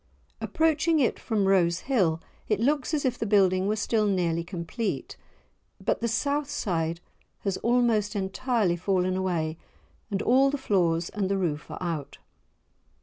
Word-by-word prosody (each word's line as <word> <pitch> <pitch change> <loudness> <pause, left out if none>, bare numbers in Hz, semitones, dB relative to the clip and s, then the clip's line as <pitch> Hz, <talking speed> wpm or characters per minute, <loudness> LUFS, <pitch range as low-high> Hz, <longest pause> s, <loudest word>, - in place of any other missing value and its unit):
Approaching 320 0 +2
it 255 - +1
from 215 -4 0
Rose 175 -3 +3
Hill, 185 -12 +1 0.3
it 210 -2 +1
looks 280 +5 +1
as 300 -3 0
if 250 -1 0
the 225 - -1
building 190 -2 +3
were 210 - +1
still 215 0 +1
nearly 170 -4 0
complete, 175 +6 -4 0.6
but - - -1
the 235 - +1
south 280 +5 0
side 165 - -1 0.4
has 195 -2 -1
almost 230 -4 +1
entirely 200 -1 0
fallen 185 0 0
away 170 -4 -1 0.5
and 200 -1 -2
all 265 +3 +4
the 290 - -1
floors 175 -9 +1
and 200 -2 -2
the 195 - +1
roof 155 -6 -2
are - - -6
out. 165 -6 -4
200 Hz, 150 wpm, -27 LUFS, 175-240 Hz, 0.6 s, all